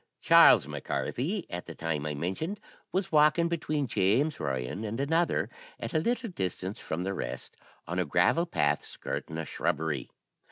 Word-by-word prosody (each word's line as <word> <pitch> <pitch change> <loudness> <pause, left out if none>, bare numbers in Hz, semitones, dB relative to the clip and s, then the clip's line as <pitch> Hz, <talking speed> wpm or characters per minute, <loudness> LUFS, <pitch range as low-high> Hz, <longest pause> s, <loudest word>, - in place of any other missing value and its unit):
"Charles - - +7
Mac - - -6
Carthy, 175 - -2
at 90 0 -6
the 85 - -7
time 80 -2 -2
I 75 - -3
mentioned, 95 - -3 0.3
was 190 0 -1
walking 155 +2 +5
between 155 -3 -1
James 115 +8 +1
Ryan 65 - -3
and 110 +3 -3
another, 160 +5 +1 0.3
at - - -5
a 160 - +3
little 235 +5 -1
distance 95 - -3
from 85 +3 -3
the 95 +1 -2
rest, - - -5 0.3
on 85 +2 -2
a 90 - +1
gravel 90 - +3
path, 75 - +1
skirting 80 - -5
a 80 - -3
shrubbery. 75 -4 -2
100 Hz, 165 wpm, -29 LUFS, -, 0.3 s, Charles